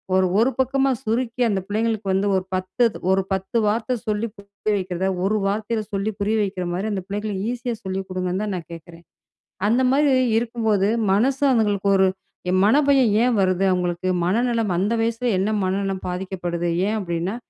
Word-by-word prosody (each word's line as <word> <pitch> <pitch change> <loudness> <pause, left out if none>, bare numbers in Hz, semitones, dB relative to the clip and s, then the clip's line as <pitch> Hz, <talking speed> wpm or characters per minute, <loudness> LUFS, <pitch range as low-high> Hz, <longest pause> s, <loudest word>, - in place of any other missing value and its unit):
ஒரு 190 - +4
ஒரு 250 +4 +3
பக்கமா 270 +1 +2
சுருக்கி 235 +2 -1
அந்த 195 -2 0
பிள்ளைங்களுக்கு 215 -1 -1
வந்து 195 +2 +1
ஒரு 185 - 0
10 185 +6 0 0.3
ஒரு 195 - +2
10 190 +5 -2
வார்த்தை 225 +4 0
சொல்லி 215 +2 0
புரிய 200 +1 -4
வைக்கிறத 185 0 -2 0.2
ஒரு 215 +2 +1
வார்த்தையில 215 +2 -1
சொல்லி 200 +2 -1
புரிய 210 +2 +1
வைக்கிற 190 -2 -3
மாதிரி 195 +5 -2
அந்த 190 -2 -3
பிள்ளைகளுக்கு 205 -1 -3
ஈஸியா 245 -1 -3
சொல்லி 190 0 -3
கொடுங்கன்னு 185 +2 -2
தான் 205 -2 -2
நான் 165 - -9
கேட்குறேன். 170 +1 -12 0.7
அந்த 245 +4 +3
மாதிரி 285 0 +3 0.3
இருக்கும்போது 225 -4 0 0.2
மனசு 260 +7 +1
அவங்களுக்கு 205 -4 +1
ஒரு 190 0 +4 0.6
மனபயம் 270 0 +4
ஏன் 245 -1 +2
வருது? 185 0 +2
அவங்களுக்கு 180 0 -1 0.2
மனநலம் 230 -1 +1
அந்த 200 +5 +1
வயசில 230 +2 -1
என்ன 195 +3 0
மனநலம் 195 0 -2
பாதிக்கப்படுது? 180 -2 -3 0.2
ஏன் 220 +1 0
அப்படின்னா 175 +2 -2
205 Hz, 160 wpm, -22 LUFS, 190-230 Hz, 0.7 s, ஒரு